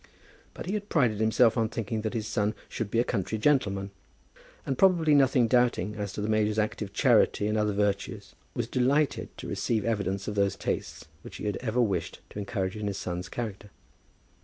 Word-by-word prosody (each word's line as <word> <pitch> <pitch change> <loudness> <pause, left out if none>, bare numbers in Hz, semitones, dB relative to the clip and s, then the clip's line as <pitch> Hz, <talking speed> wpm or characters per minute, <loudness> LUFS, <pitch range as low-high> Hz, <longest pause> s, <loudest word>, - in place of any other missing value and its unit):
But - - -7
he 185 - -3
had 210 0 -3
prided 120 -10 +2
himself 110 +1 +4
on 110 -1 +1
thinking 110 -1 -3
that 110 +1 -3
his 110 -2 -2
son 105 -1 0
should 110 -3 -4
be 115 - -1
a 120 - +4
country 110 -2 -2
gentleman, 100 -6 +1 0.7
and, 135 - -1
probably 170 -3 +4
nothing 135 -4 +4
doubting 120 -5 +2
as 100 -2 -4
to - - -4
the 105 - -1
major's 110 -1 +1
active 105 -1 -1
charity 100 - +3
and 105 +1 0
other 105 -1 +1
virtues, 100 -1 -2 0.2
was - - -1
delighted 135 +3 +1
to - - -7
receive 110 -3 -1
evidence 100 -4 -1
of 105 - -2
those 100 -1 +1
tastes - - -4 0.2
which - - -11
he - - -6
had 105 -2 -1
ever 120 0 -2
wished 95 -7 0
to - - -6
encourage 100 -2 -2
in 105 -1 -3
his 100 -1 -3
son's 90 -1 -4
character. 105 -3 -5
110 Hz, 195 wpm, -28 LUFS, 100-120 Hz, 0.7 s, himself